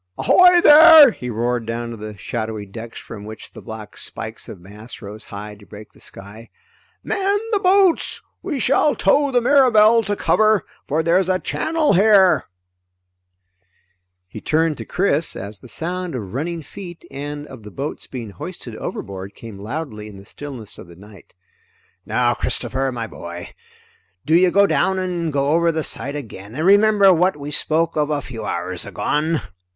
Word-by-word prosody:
Ahoy 360 -1 +6
there!" 310 -3 +9
he 125 - -7
roared 120 0 -2
down 115 +1 -4
to - - -6
the 105 -1 -9
shadowy 110 0 -5
decks 115 +3 -10
from 105 -2 -9
which 110 +1 -10
the - - -12
black 110 -2 -9
spikes - - -8
of - - -9
masts 105 +6 -12
rose 105 0 -9
high 105 +1 -8
to 105 0 -16
break 105 +1 -12
the - - -21
sky. 105 +4 -11 0.5
"Man 395 +1 0
the 415 - +2
boats! 380 -2 +3 0.2
We 315 -8 -4
shall 275 +4 +2
tow 285 0 +2
the 250 -2 +2
Mirabelle 235 -4 +5
to 205 -1 -2
cover, 215 -2 +2 0.2
for 155 +3 0
there's 180 +3 +2
a 185 - +2
channel 315 - 0
here!" 195 -1 +5 1.8
He 105 +3 -10
turned 160 0 0
to - - -6
Chris 170 -4 0
as 100 +1 -8
the 125 - -14
sound 175 +5 -4
of 105 -6 -6
running 165 +5 -3
feet 175 +1 -10
and 145 +1 -6
of 130 -5 -12
the 105 - -11
boats 140 +8 -6
being 120 -5 -7
hoisted 95 - -9
overboard 95 0 -7
came 110 -4 -11
loudly 110 -1 -6
in 105 -2 -12
the 100 - -14
stillness 125 -4 -9
of - - -11
the 85 - -14
night. 100 0 -17 0.7
"Now - - +1
Christopher, 135 0 -2
my 120 -2 -4
boy, 85 -4 -9 0.8
do 155 - 0
you 180 +1 +5
go 200 +3 +4
down 190 -1 +1
and 175 -3 -2
go 140 0 0
over 170 +2 +3
the 160 -1 -2
side 140 0 -4
again, 110 -6 -8
and 155 +3 -2
remember 200 0 +5
what 180 -1 +1
we 145 0 -7
spoke 160 +2 0
of 150 -1 0
a 145 -2 -2
few 115 -4 -7
hours 90 +1 -4
agone!" 155 +2 -1
145 Hz, 175 wpm, -20 LUFS, -, 1.8 s, there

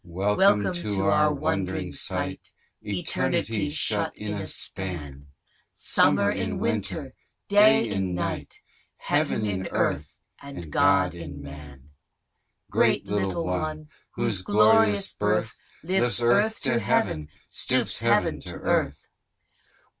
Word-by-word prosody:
Chorus. 95 +4 -1
Welcome 195 -1 +4
to 105 - -1
our 150 +6 +3
wond'ring 95 - -2
sight 95 0 -4 0.3
Eternity 105 +5 -1
shut 110 -9 -1
in 105 0 -5
a 100 -2 -5
span! 75 -10 -4 0.4
Summer - - +3
in - - -2
winter! - - -2 0.3
Day 205 - +5
in 95 -3 -2
night! 90 - -4 0.4
Heaven 110 - 0
in 95 -2 -2
Earth! 75 -1 -2 0.2
and 90 - -9
God 90 +4 +3
in 80 -5 -9
Man! 70 -1 -12 0.8
Great - - +2
little 95 -4 -1
one, 155 +11 -3 0.3
whose 115 -6 0
glorious 105 +1 +3
birth, - - -1 0.3
Lifts 160 -9 +2
Earth 205 - +2
to 130 -5 +1
Heaven, 75 -7 0 0.2
stoops - - 0
heaven - - +2
to - - -8
earth. - - -1
100 Hz, 115 wpm, -25 LUFS, 90-120 Hz, 0.8 s, Day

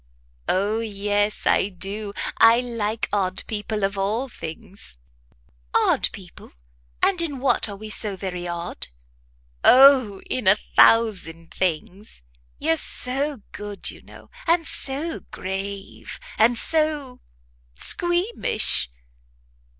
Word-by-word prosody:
"O 205 +4 0
yes, 205 -1 -2
I 195 - +2
do! 200 +2 -5 0.3
I 230 +1 +6
like 230 -3 -3
odd 185 -2 -1
people 210 -1 -4
of 195 0 -1
all 220 +7 -1
things." 165 - -10 0.8
"Odd - - +3
people? - - -13 0.5
and 370 -3 +3
in 300 -5 -3
what 250 -4 0
are 200 - -7
we 215 +2 -9
so 210 -2 +2
very 180 -2 -5
odd?" 170 0 -5 0.8
"O, 255 -6 +6
in 250 -6 -3
a 190 - +7
thousand 190 -8 +2
things. 185 - -4 0.3
You're 160 - +1
so 270 - 0
good, 205 -1 -3
you - - -15
know, - - -16 0.2
and 335 0 +2
so 295 +5 -1
grave, 195 +1 -6 0.2
and 235 +2 +4
so 300 -4 +4 0.6
squeamish." 345 - +1
210 Hz, 110 wpm, -23 LUFS, 195-255 Hz, 0.8 s, a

